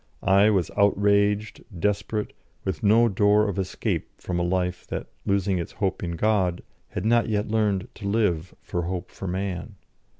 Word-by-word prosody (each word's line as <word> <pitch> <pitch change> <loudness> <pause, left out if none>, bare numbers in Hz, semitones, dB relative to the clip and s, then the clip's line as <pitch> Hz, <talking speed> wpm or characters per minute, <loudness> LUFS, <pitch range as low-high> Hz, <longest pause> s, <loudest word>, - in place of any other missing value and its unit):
I 100 +2 +5
was 95 -5 +1
outraged, 100 +1 +2 0.2
desperate, 105 +2 -1 0.3
with 95 - -2
no 110 +3 +5
door 105 +1 +3
of 100 -1 -2
escape 95 -1 -2
from 90 -1 -3
a - - +1
life 90 0 -1
that, - - -4 0.2
losing 100 -1 +1
its 85 - -5
hope 95 -2 -1
in 85 -1 -3
God, 95 -2 +1 0.2
had 90 - -5
not 115 +1 +3
yet 105 0 0
learned 105 -3 +1
to 100 - -7
live 95 -5 0
for 85 - -2
hope 90 +1 -4
for 95 - -7
man. 95 +2 -3
100 Hz, 165 wpm, -25 LUFS, 90-105 Hz, 0.3 s, I